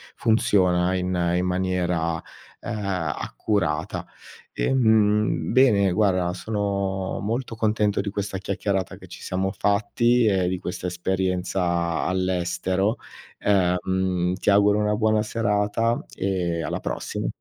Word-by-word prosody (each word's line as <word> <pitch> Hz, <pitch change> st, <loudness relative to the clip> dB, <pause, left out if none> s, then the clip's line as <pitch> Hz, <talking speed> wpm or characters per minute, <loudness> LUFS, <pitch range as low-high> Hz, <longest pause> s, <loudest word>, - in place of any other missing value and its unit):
funziona 95 Hz, -5 st, +2 dB
in, 90 Hz, 0 st, -1 dB, 0.3 s
in 90 Hz, +1 st, +1 dB
maniera, 90 Hz, -2 st, 0 dB, 0.5 s
uhm, 95 Hz, -7 st, -2 dB
accurata. 90 Hz, -2 st, -2 dB, 0.5 s
Ehm, 110 Hz, -6 st, +2 dB
bene, 110 Hz, -7 st, +4 dB
guarda, 95 Hz, -3 st, +2 dB
sono 100 Hz, -2 st, -2 dB
molto 115 Hz, +3 st, -3 dB
contento 105 Hz, -2 st, +1 dB
di 100 Hz, 0 st, -1 dB
questa 100 Hz, -1 st, -3 dB
chiacchierata 95 Hz, 0 st, -2 dB
che 95 Hz, -1 st, -14 dB
ci 90 Hz, -, -11 dB
siamo 95 Hz, +1 st, -2 dB
fatti 110 Hz, +5 st, +2 dB
e 95 Hz, -3 st, +2 dB
di 90 Hz, 0 st, -2 dB
questa 90 Hz, 0 st, -4 dB
esperienza 90 Hz, -1 st, -1 dB
all'estero 95 Hz, +2 st, 0 dB, 0.4 s
ehm, 90 Hz, -1 st, +1 dB
ti -, -, -1 dB
auguro 105 Hz, +1 st, +4 dB
una 105 Hz, 0 st, +1 dB
buona 110 Hz, 0 st, +2 dB
serata 110 Hz, +1 st, 0 dB
e 90 Hz, -4 st, -1 dB
alla -, -, -3 dB
prossima. -, -, -4 dB
95 Hz, 115 wpm, -24 LUFS, 90-105 Hz, 0.5 s, bene